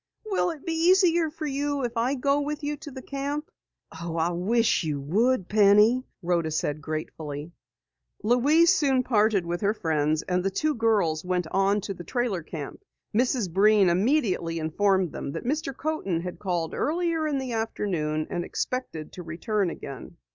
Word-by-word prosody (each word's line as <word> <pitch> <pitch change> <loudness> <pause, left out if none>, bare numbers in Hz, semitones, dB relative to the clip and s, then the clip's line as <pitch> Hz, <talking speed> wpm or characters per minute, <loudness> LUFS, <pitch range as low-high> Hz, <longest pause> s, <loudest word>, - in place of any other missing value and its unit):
"Will 395 -4 +1
it 320 -4 -7
be 330 - -1
easier 340 -1 +4
for 315 0 -6
you 285 0 -1
if 240 0 -3
I 240 +4 +1
go 280 +2 +1
with 295 +1 -4
you 295 +1 -1
to 295 +1 -10
the 260 -2 -9
camp?" 285 +2 -4 0.5
"Oh, 170 -1 -4
I 165 +2 +1
wish 220 +5 +2
you 150 -3 -2
would, 195 - +1
Penny!" 210 +4 +5 0.2
Rhoda 170 -2 +1
said 150 -1 -2
gratefully. 155 0 -5 0.7
Louise 285 +9 +5
soon 270 -4 +2
parted 215 -6 +2
with 175 +1 -3
her 210 +1 +1
friends, 155 -3 0
and 180 -1 -1
the 195 - +1
two 305 +10 0
girls 210 - +1
went 180 -1 -1
on 195 +2 +2
to 195 0 -4
the 175 - -9
trailer 240 -5 -1
camp. 155 -3 -7 0.3
Mrs. 235 -5 +1
Breen 205 0 +5
immediately 185 - +1
informed 185 +2 +1
them 140 - -5
that - - -5
Mr. 290 +2 -1
Coaten 275 - -2
had 180 0 -6
called 175 -4 -2
earlier 325 +1 0
in 290 -2 0
the 260 -2 -3
afternoon 175 -9 -1
and 175 - -1
expected 170 -9 -4
to 180 - -7
return 180 +4 -1
again. 140 +1 -8
210 Hz, 170 wpm, -26 LUFS, 170-275 Hz, 0.7 s, Penny